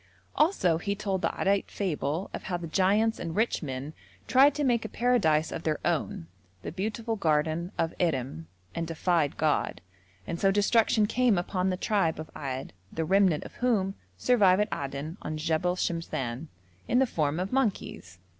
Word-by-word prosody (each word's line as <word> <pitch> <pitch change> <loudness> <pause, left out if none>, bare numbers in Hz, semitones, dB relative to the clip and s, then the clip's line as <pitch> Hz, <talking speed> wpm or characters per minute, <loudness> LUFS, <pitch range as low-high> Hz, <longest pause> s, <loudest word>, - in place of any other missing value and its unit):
Also 190 - +3
he 200 +3 -2
told 195 -2 -2
the - - +1
Addite 195 0 +1
fable 170 -2 -2
of - - -6
how 180 - -1
the 175 - -6
giants 200 +6 +2
and 165 -1 -4
rich 225 +3 +1
men 135 0 -5 0.3
tried 275 +3 +5
to 295 - -1
make 240 -4 +2
a 220 - -5
paradise 185 -11 +2
of 165 - -4
their 155 -2 0
own, 140 - -1 0.4
the - - -4
beautiful 220 +5 -3
garden 160 -1 0
of 165 0 0
Irem, 130 - -1 0.3
and 165 0 -3
defied 165 -2 0
God, 150 - 0 0.5
and 170 +9 -4
so 195 - +4
destruction 210 +2 +3
came 235 -1 +2
upon 185 +1 0
the 185 - -1
tribe 190 -6 +1
of 155 - -7
Ad, 135 -3 -5 0.2
the 160 - -2
remnant 190 -3 +3
of - - -11
whom 210 -6 +1 0.2
survive 200 -7 +4
at 210 +1 0
Aden 140 +5 -5
on 155 - -4
Jebel 165 +3 0
Shemshan, 160 -6 -3 0.4
in 245 - +2
the 265 - +5
form 155 - -1
of 185 +4 -3
monkeys. 200 - -2
180 Hz, 175 wpm, -28 LUFS, 155-210 Hz, 0.5 s, tried